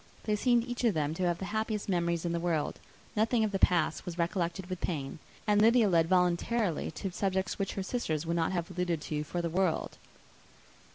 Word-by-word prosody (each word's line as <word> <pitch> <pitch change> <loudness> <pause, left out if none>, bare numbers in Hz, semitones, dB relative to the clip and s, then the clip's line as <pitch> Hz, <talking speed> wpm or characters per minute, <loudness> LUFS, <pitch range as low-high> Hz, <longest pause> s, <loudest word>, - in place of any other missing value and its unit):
They 210 - +1
seemed 240 +2 +3
each 245 0 -4
of 225 -6 +3
them 150 -1 0
to 180 +2 0
have 175 -1 +1
the 190 - -5
happiest 220 -1 -1
memories 170 -3 0
in 170 - 0
the 170 - 0
world. 165 -3 -1 0.4
Nothing 225 +2 +2
of 215 - 0
the 195 - -1
past 170 -4 +2
was 175 -2 -6
recollected 175 +1 -1
with 185 -1 -5
pain; 145 -4 -3 0.3
and 210 -1 +4
Lydia 230 0 +5
led 165 -3 +3
voluntarily 180 +1 +1
to 190 +3 -5
subjects 190 +1 -1
which 195 - -1
her 195 - -3
sisters 170 -8 -2
would 170 +1 -1
not 165 0 +1
have 175 -1 -2
alluded 180 -2 -1
to 150 0 -3
for 175 +3 -3
the - - +1
world. 185 -2 0
180 Hz, 210 wpm, -31 LUFS, 170-210 Hz, 0.4 s, Lydia